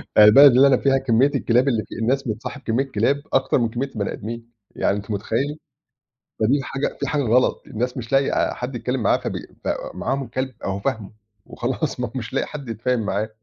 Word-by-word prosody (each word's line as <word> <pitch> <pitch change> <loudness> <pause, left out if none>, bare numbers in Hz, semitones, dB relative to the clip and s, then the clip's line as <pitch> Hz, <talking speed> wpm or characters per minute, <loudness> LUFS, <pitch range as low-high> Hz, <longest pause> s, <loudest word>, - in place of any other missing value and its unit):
يعني 105 - +9
البلد 140 +4 +9
اللي 135 +2 +7
أنا 135 -2 +4
فيها 135 +1 +2
كمّية 135 +1 +2
الكلاب 125 0 +2
اللي 115 -5 +1
في - - -10
الناس 130 +5 0
بتصاحب 115 +5 -5
كمّية 125 0 0
كلاب، 130 +7 +1
أكتر 135 0 +2
من 115 -2 +1
كمّية 125 +5 -3
البَني 105 -7 -4
آدمين. 115 +2 -7 0.2
يعني 100 - +1
أنت 100 +2 -7
متخيِّل؟ 130 +9 -2 0.8
فدي 120 +6 +3
الحاجة 135 0 -3
في - - -2
حاجة 145 -2 0
غلط 125 +1 +2
الناس 125 +4 -3
مش 115 -2 -6
لاقية 135 0 +3
آآ - - +1
حد 125 +1 -5
يتكلم 125 0 -2
معاها - - +3
فبي - - -4 0.2
ف - - -5 0.3
معاهم 135 -1 -2
كلب 130 +2 -3
أهو 95 0 -2
فاهمه، 110 -3 -3 0.3
وخلاص - - -3
ما - - -1
هو - - -13
مش - - -5
لا - - +1
قي - - -4
حد 140 -5 -8
يتفاهم 115 +3 -1
معاه. 105 +2 -1
125 Hz, 215 wpm, -22 LUFS, 110-135 Hz, 0.8 s, يعني